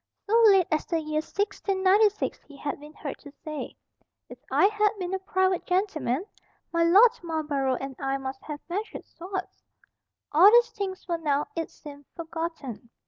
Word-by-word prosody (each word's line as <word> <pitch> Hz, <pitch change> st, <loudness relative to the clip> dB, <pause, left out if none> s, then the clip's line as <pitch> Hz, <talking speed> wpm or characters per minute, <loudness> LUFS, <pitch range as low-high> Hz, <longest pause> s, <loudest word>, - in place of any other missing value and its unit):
So 420 Hz, -, -3 dB
late 385 Hz, -3 st, +6 dB
as 310 Hz, -, +1 dB
the 330 Hz, -, 0 dB
year 305 Hz, 0 st, -1 dB
1696 400 Hz, +2 st, +1 dB
he 285 Hz, -, -14 dB
had 285 Hz, 0 st, -4 dB
been 300 Hz, +1 st, -12 dB
heard 285 Hz, -3 st, -7 dB
to 285 Hz, -, -13 dB
say, 305 Hz, -2 st, -5 dB, 0.5 s
"If -, -, -11 dB
I -, -, +4 dB
had 420 Hz, 0 st, +3 dB
been 365 Hz, -1 st, -4 dB
a 385 Hz, -, -1 dB
private 375 Hz, -1 st, +1 dB
gentleman, 360 Hz, -, 0 dB, 0.5 s
my 335 Hz, 0 st, +3 dB
Lord 400 Hz, +8 st, +7 dB
Marlborough 300 Hz, -6 st, -1 dB
and 270 Hz, -1 st, -6 dB
I 270 Hz, 0 st, -1 dB
must 265 Hz, 0 st, -6 dB
have 295 Hz, -1 st, -6 dB
measured 400 Hz, +5 st, -5 dB
swords." 370 Hz, +2 st, -7 dB, 0.7 s
All 340 Hz, +7 st, +8 dB
these 475 Hz, +2 st, +5 dB
things 390 Hz, -2 st, -5 dB
were 340 Hz, -2 st, -1 dB
now, 295 Hz, -2 st, 0 dB
it 330 Hz, -1 st, -3 dB
seemed, 285 Hz, -1 st, -12 dB
forgotten. 325 Hz, -, -6 dB
335 Hz, 165 wpm, -27 LUFS, 295-385 Hz, 0.7 s, All